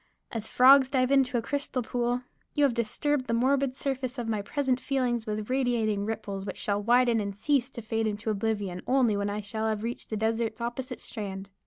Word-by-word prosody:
As 220 -2 -3
frogs 265 +1 +7
dive 255 -1 +2
into 265 -3 +3
a 230 - -1
crystal 285 -3 -2
pool, 245 +1 -1 0.3
you 295 - +3
have 275 -4 +4
disturbed 255 +4 -1
the 230 - +1
morbid 265 +2 +2
surface 265 -2 -3
of 240 -2 -3
my 215 -2 0
present 260 +3 0
feelings 250 -5 -1
with 210 0 -3
radiating 230 -6 +1
ripples 205 -3 -4
which 195 -1 -6
shall 205 0 -1
widen 240 +1 +4
and 200 -1 -3
cease 260 +3 +1
to 235 -3 -8
fade 225 0 -1
into 210 +1 -2
oblivion 205 -3 -2
only 250 -5 +3
when 200 0 -1
I 205 +1 -3
shall 220 +2 -3
have 215 -1 -1
reached 235 +1 -4
the 215 - -2
desert's 225 +2 -1
opposite 240 +2 -4
strand. 195 -3 -6
235 Hz, 200 wpm, -28 LUFS, 215-255 Hz, 0.3 s, frogs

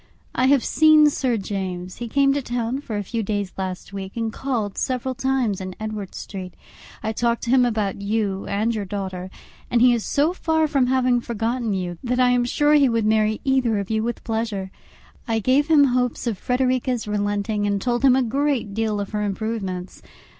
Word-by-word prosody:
I 255 - +2
have 275 -2 +4
seen 310 -1 +6
Sir 255 -4 0
James; 185 -3 -4
he 240 - -5
came 275 +3 +3
to 285 - -1
town 245 +1 -2
for 220 -7 -4
a 205 - -2
few 225 +4 -3
days 205 -2 -2
last 185 0 -5
week, 195 +2 -6
and 225 -1 -2
called 230 -7 -2
several 260 0 -2
times 255 -6 0
in 185 -1 -6
Edward 215 -3 -5
Street. 185 -3 -7 0.5
I 220 - -1
talked 235 +1 0
to 235 - -1
him 255 -1 +5
about 210 -4 -2
you 200 -2 -1
and 215 +3 0
your 215 -2 -2
daughter, 190 -2 -5 0.4
and 240 - +2
he 245 +1 +6
is 230 -2 -1
so 300 +5 +1
far 320 -3 +1
from 275 -4 +2
having 255 -1 +2
forgotten 230 -1 -2
you, 175 -2 -4
that 250 0 -1
I 250 -1 +5
am 245 -1 +2
sure 295 +4 +2
he 285 -3 +5
would 230 -2 +1
marry 215 0 +2
either 260 -5 +2
of 200 +1 -3
you 220 0 +1
with 235 +2 -3
pleasure. 220 -4 -3 0.6
I 225 -1 +1
gave 260 +7 +2
him 310 -3 +6
hopes 250 -2 +1
of 235 -3 0
Frederica's 250 -2 0
relenting, 205 0 -1
and 200 -1 0
told 240 +4 -1
him 260 -2 +6
a 265 - +3
great 270 -3 0
deal 215 -1 -1
of 200 - -4
her 210 -1 -2
improvements. 200 -3 -4
225 Hz, 200 wpm, -23 LUFS, 205-255 Hz, 0.6 s, seen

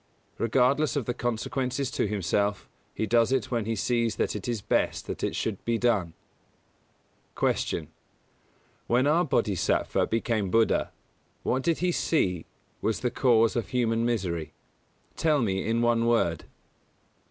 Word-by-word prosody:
Regardless 130 +7 +2
of 140 -5 -1
the 120 - -1
consequences 125 +3 -2
to - - 0
himself, 100 0 -1 0.2
he 110 - -2
does 115 +2 +3
it 130 -3 0
when 115 -3 0
he 115 +1 -1
sees 115 +3 0
that - - -1
it 105 +1 -5
is 120 -2 -1
best - - 0
that - - -6
it - - -1
should 105 -4 -3
be 115 -1 0
done. 105 -9 +1 1.2
116. - - 0
Q. 75 - -14 1.0
_When 125 +3 +3
our 165 +4 +3
Bōdhisattva 105 - +1
became 110 -3 0
Buddha, 115 +3 +2 0.5
what 130 - 0
did 165 +4 +1
he 180 - +2
see 90 - 0 0.3
was 110 -2 -1
the 125 - 0
cause 115 -3 +3
of 115 -5 -2
human 115 -2 +1
misery? 90 -10 -2 0.6
Tell 155 -3 +2
me 95 -6 0
in 115 +1 0
one 115 -1 +2
word. 115 -8 +1
115 Hz, 150 wpm, -27 LUFS, 105-125 Hz, 1.2 s, does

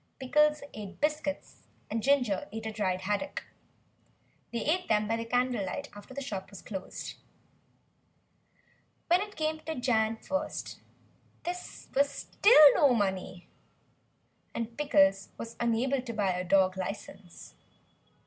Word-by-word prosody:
Pickles 300 +3 +3
ate 205 -3 -8
biscuits 300 -1 -2 0.3
and 225 +1 -2
Ginger 245 -8 +2
ate 220 +1 -6
a 220 - -2
dried 185 -4 -1
haddock. 205 +9 -2 1.1
They 235 - -3
ate 360 +4 +1
them 210 -1 +2
by 230 +1 -1
candle 245 -2 +1
light 280 +9 -4
after 205 +5 -12
the 280 - -4
shop 195 -6 -5
was 195 -2 -11
closed. 190 -3 -6 1.9
When 350 +2 +5
it 410 0 -6
came 315 0 -1
to 320 0 -5
Jan. 225 -3 +1
1st 285 +5 -4 0.6
there 350 - -1
was 285 -5 -2
still 310 - +6
no 280 -5 +4
money, 190 -4 -2 1.1
and 230 0 -4
Pickles 195 -9 +3
was 230 0 -7
unable 240 +3 +1
to 240 -2 -6
buy 205 -3 +1
a 180 0 -2
dog 185 0 +3
licence. 190 -1 -7
230 Hz, 130 wpm, -30 LUFS, 200-285 Hz, 1.9 s, still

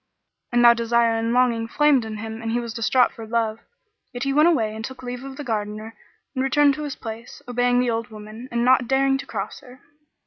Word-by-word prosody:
And 240 0 +4
though 235 - +9
desire 235 0 +2
and 225 +1 -1
longing 240 -2 +2
flamed 285 -2 +3
in 220 -1 -6
him 220 +1 -6
and 225 - -4
he 240 - +1
was 235 -2 -5
distraught 245 +2 +2
for 225 -1 -10
love, 225 -1 -1 0.5
yet 245 -1 -5
he 275 0 0
went 300 +3 +5
away 220 -10 0
and 220 - -6
took 260 +2 -8
leave 250 0 -6
of 270 0 -8
the 295 - -5
Gardener 215 -2 -4 0.4
and 260 -2 -1
returned 285 +1 +4
to 300 +2 -5
his 285 - -5
place, 225 0 -9
obeying 245 0 +2
the 250 -1 +1
old 230 0 -2
woman 215 +3 -10
and 235 0 0
not 255 -1 +4
daring 270 +1 +2
to - - -8
cross - - -5
her. 250 +1 -15
240 Hz, 230 wpm, -23 LUFS, 225-260 Hz, 0.5 s, though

